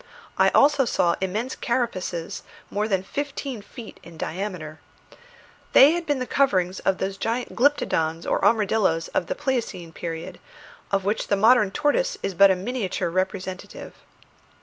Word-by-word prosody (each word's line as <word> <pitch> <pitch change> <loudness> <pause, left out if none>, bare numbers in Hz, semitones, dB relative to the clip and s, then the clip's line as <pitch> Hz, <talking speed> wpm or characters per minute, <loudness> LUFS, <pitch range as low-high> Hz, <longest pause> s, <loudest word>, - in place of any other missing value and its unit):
I - - +4
also 285 -1 +5
saw 175 -7 +1
immense 215 +7 -2
carapaces 185 -9 -2 0.3
more 210 +1 -1
than 190 -3 0
fifteen 275 0 -5
feet 225 +2 -11
in 165 0 -13
diameter. 165 -4 -5 0.9
They 280 +3 +8
had 345 0 -3
been 290 -2 +1
the 255 - -3
coverings 190 -10 +1
of 190 - 0
those 195 0 -3
gigantic 235 +4 -3
glyptodons 165 - +1
or - - 0
armadilloes 205 -6 +2
of 175 - -1
the - - -2
pleiocene 240 - -3
period, 170 +2 -6 0.5
of 195 -1 0
which 210 +2 -1
the 200 - +2
modern 220 0 +5
tortoise 305 - 0
is 195 - -2
but 195 +3 +6
a 190 - +3
miniature 195 -2 -3
representative. 185 0 -4
200 Hz, 150 wpm, -24 LUFS, 180-250 Hz, 0.9 s, They